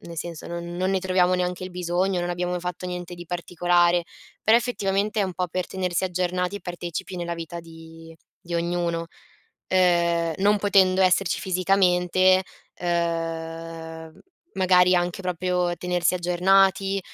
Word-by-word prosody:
nel 170 -1 -10
senso, 170 -1 -6
non 170 0 -6
non 185 +1 0
ne 190 -1 +1
troviamo 185 -1 +2
neanche 180 0 -2
il 185 - -7
bisogno, 180 +1 -1
non 175 0 -2
abbiamo 180 0 -2
fatto 180 0 -5
niente 180 -1 -6
di 175 0 -10
particolare, 175 0 +1 0.4
però 220 +2 +5
effettivamente 210 -3 0
è 200 - +2
un 185 - -5
po' 180 +1 -2
per 180 +1 -3
tenersi 185 -1 -2
aggiornati 180 +1 -1
e - - -9
partecipi 175 0 -6
nella 170 -1 -3
vita 170 0 -7
di 165 0 -13 0.3
di 170 0 -7
ognuno. 170 0 -1 0.6
Ehm, 170 -2 +2
non 205 +2 +4
potendo 190 -2 +4
esserci 185 -1 +2
fisicamente, 185 0 +3 0.3
ehm, 165 -1 -4 0.3
magari 180 -1 +4
anche 175 +1 -1
proprio 180 0 -1
tenersi 180 0 0
aggiornati, 195 +2 +2
180 Hz, 145 wpm, -24 LUFS, 170-185 Hz, 0.6 s, però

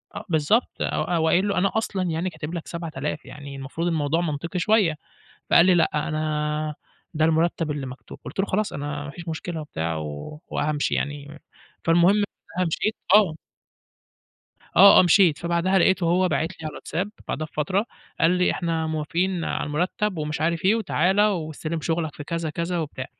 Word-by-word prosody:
أ - - -5
بالضبط، 160 - +2
أو - - 0
أو 165 -2 +1
قايل 185 +5 +3
له 200 - -1
أنا 195 +1 +2
أصلًا 200 -4 -1
يعني 170 +1 -1
كاتب 160 0 -7
لك 170 - -5
7000 155 -4 -4
يعني 140 -1 -9
المفروض 135 +6 -4
الموضوع 160 0 +1
منطقي 170 +3 -3
شوية. 195 -4 +3 0.6
فقال 170 - +7
لي: 185 - +5
"لأ، 155 -3 +1
أنا 155 -1 -1 0.4
ده 155 0 +2
المرتّب 165 0 +1
اللي 145 -2 -3
مكتوب." 130 +1 -10
قُلت - - -4
له: 200 - 0
"خلاص، 210 +2 -1
أنا 145 0 -4
ما 140 - -6
فيش 165 +3 -10
مشكلة 160 0 -4
وبتاع 80 - -3
و 75 - -6
وهامشي 150 -1 0
يعني." 145 +1 -4 0.4
فالمهم 170 +3 +5 0.5
فبقى 185 - +2
مشيت 210 +6 -1 0.2
آه. 190 -7 +5 1.4
آه، 200 +3 +9
آه - - +8
مشيت. 175 -3 +5
فبعدها 170 +3 +1
لقيته 190 0 +3
هو 180 +2 +3
باعت 160 +1 0
لي 185 - -11
على 155 - -3
الواتساب، 185 +7 -4 0.2
بعدها 155 - -2
بفترة. 185 +8 -1 0.3
قال 165 - +5
لي: 180 0 +2
"إحنا 165 -2 -1
موافقين 165 +3 -1
على - - -2
المرتّب 180 +5 -1
ومش 150 0 -3
عارف 165 +1 0
إيه 200 +4 +5
وتعالَ 190 -2 +1
واستلم 165 -5 -1
شغلك 160 -1 -2
في 145 - -8
كذا 165 -1 -3
كذا 170 +3 -2
وبتاع." 140 -4 -4
165 Hz, 175 wpm, -24 LUFS, 150-180 Hz, 1.4 s, آه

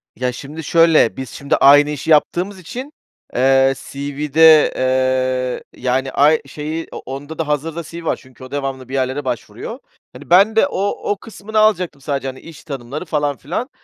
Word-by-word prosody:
Ya, 125 0 -1
şimdi 145 +6 -8
şöyle, 165 -5 +4
biz 130 -2 -5
şimdi 140 +4 -1
aynı 145 +1 +6
işi 150 +2 -3
yaptığımız 180 +5 +2
için, 255 - -8 0.4
eee, 135 +1 +4
CV'de, 150 +3 +3
eee, 130 -1 -1
yani, 130 +1 0
ay 150 +4 +4
şeyi, 155 +3 -5
o - - -7
onda 145 +4 -7
da 165 - -1
hazırda 155 +3 -2
CV 165 +1 -9
var - - +1
çünkü 130 -1 -17
o 130 - -11
devamlı 135 -3 -4
bir - - -8
yerlere 135 +1 -1
başvuruyor. - - -5 0.3
Hani, - - -13
ben 200 +6 +5
de 225 - +4
o 200 -6 -3
o 205 - -1
kısmını 215 +1 -4
alacaktım 180 -9 +2
sadece, 140 -1 -3
hani, 130 0 -6
iş 165 -3 -13
tanımları 140 +2 -6
falan 145 -4 -1
filan. 185 - -4
145 Hz, 175 wpm, -18 LUFS, 130-165 Hz, 0.4 s, aynı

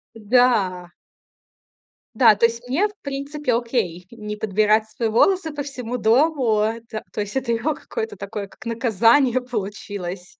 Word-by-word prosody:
Да. 210 -6 +2 1.3
Да, 225 -2 +6
то 230 +3 +3
есть 235 +1 -2
мне, 335 +12 +2
в - - -14
принципе, 280 -1 -3
окей. 225 -8 -2
Не 210 -2 -6
подбирать 215 +1 +1
свои 225 0 -2
волосы 325 - +2
по 290 - -4
всему 250 -3 -5
дому- 245 -1 +2
это 225 +1 -3
То 210 - -2
есть 205 +3 -6
это 260 -3 -1
его 285 +7 0
какое-то 450 +6 -5
такое 200 0 -6
как - - -16
наказание 235 +3 +3
получилось. 200 -5 -6
230 Hz, 145 wpm, -22 LUFS, 210-255 Hz, 1.3 s, Да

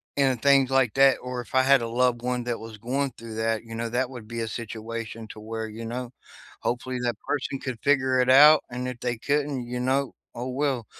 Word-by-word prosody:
and, 135 -4 +2
things 140 -2 +5
like 130 -4 +2
that. 135 0 +6
Or 125 -1 -4
if 120 - -10
I 130 - +5
had 135 -1 +5
a 115 - -2
loved 120 0 +1
one 125 0 -1
that 120 -1 -3
was 110 -1 -9
going 130 +5 -1
through 115 -1 -9
that, 110 0 -1
you 115 0 -10
know, 115 0 -3
that 125 +2 0
would 120 -4 -9
be 115 +1 -4
a 115 - -2
situation 115 0 -6
to 110 - -10
where, 110 +1 -5
you 110 +2 -8
know, 120 +1 -5 0.5
hopefully 125 +1 -2
that 120 -3 -1
person 135 -1 -2
could 130 -4 -5
figure 130 -2 +2
it 125 - +1
out, 150 +4 +8
and 125 +1 -4
if 125 -1 -6
they 120 -1 -2
couldn't, 145 0 -1
you 125 +1 -4
know, 130 +1 0 0.2
oh 125 +2 -4
well. 130 -3 -1
125 Hz, 230 wpm, -26 LUFS, 115-130 Hz, 0.5 s, out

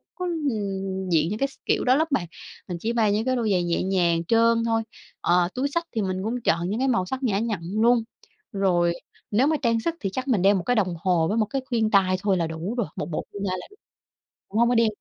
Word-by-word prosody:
có, 365 - -4
ưm, 200 - -2
diện 160 -1 +2
những 210 +2 -3
cái 275 - +2
s 275 - -17
kiểu - - +1
đó 255 +1 +4
lắm 315 +3 +2
bạn. 190 -11 +1 0.4
Mình 180 - -4
chỉ 225 +6 -2
mang 220 -3 +2
những 215 +2 0
cái 255 0 +1
đôi 230 -4 0
giày 180 -2 +2
nhẹ 170 -1 0
nhàng 175 -3 +1
trơn 230 +3 +3
thôi. 225 -1 +1 0.4
Ờ, 175 0 +3
túi 260 +3 0
xách 335 +4 -1
thì 220 - +1
mình 190 -1 -2
cũng 235 +4 -2
chọn 170 -4 +1
những 215 +4 -2
cái 265 - +1
màu 235 -8 +1
sắc 260 +8 -5
nhã 205 -6 +1
nhặn 220 -4 -2 0.2
luôn. 235 0 +4 0.5
Rồi 180 -4 +2 0.4
nếu 240 +7 +3
mà 315 - +2
trang 230 -3 +2
sức 330 +8 -2
thì 195 - -2
chắc 260 +5 -3
mình 230 -8 +2
đeo 200 +2 +5
một 185 - -1
cái 245 - +1
đồng 185 -6 +1
hồ 175 -3 +2
với 210 - -1
một 220 - +3
cái 270 +6 -3
khuyên 225 -4 0
tai 190 -2 +4
thôi 195 -2 +2
là 170 -2 0
đủ 165 +7 -4
rồi, 235 - 0
một - - -3
bộ 155 - -3
khuyên 200 - -6
tai 185 - -1
là - - -10
đủ 410 - -19 0.7
cũng 210 - -1
hông 235 0 +4
có 245 - +2
đeo 230 -1 +4
210 Hz, 270 wpm, -24 LUFS, 185-240 Hz, 0.7 s, đeo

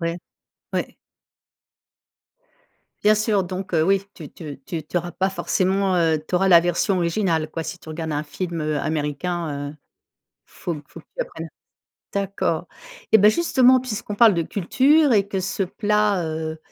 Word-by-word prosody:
ouais. 170 +1 -2 0.6
Ouais. - - -2 2.1
Bien 210 +1 +5
sûr, 210 -3 +1
donc 185 0 -5
heu, 155 - +4
oui, 195 +2 +2
tu 155 -6 -10
tu 150 -5 -9
tu 160 0 -4
tu 155 - -6
auras 175 0 -2
pas 190 - 0
forcément, 190 0 0
heu, 165 -2 +2
tu - - -4
auras 190 +2 +3
la 170 -2 +8
version 175 +3 +1
originale, 170 -3 0
quoi. 165 - -4
Si 180 - -6
tu 160 - -15
regardes 160 0 -4
un 145 +1 -1
film, 170 +2 -5
heu, 150 -1 -1
américain, 150 -1 -2
heu, - - -12 0.7
faut 175 - -5
que 150 - -9
faut 165 - -11
que 155 - -28
tu - - 0
apprennes 165 0 -8 0.6
d'accord, 200 -1 -1 0.5
et 220 - +8
ben 210 +2 +7
justement, 260 -3 +4
puisqu'on 215 -4 -5
parle 225 -3 +6
de 170 - +1
culture 265 - +3
et 200 -2 +3
que 195 -2 -2
ce 195 +1 -2
plat, 205 -1 +1
heu, 160 0 -4
180 Hz, 170 wpm, -22 LUFS, 160-200 Hz, 2.1 s, la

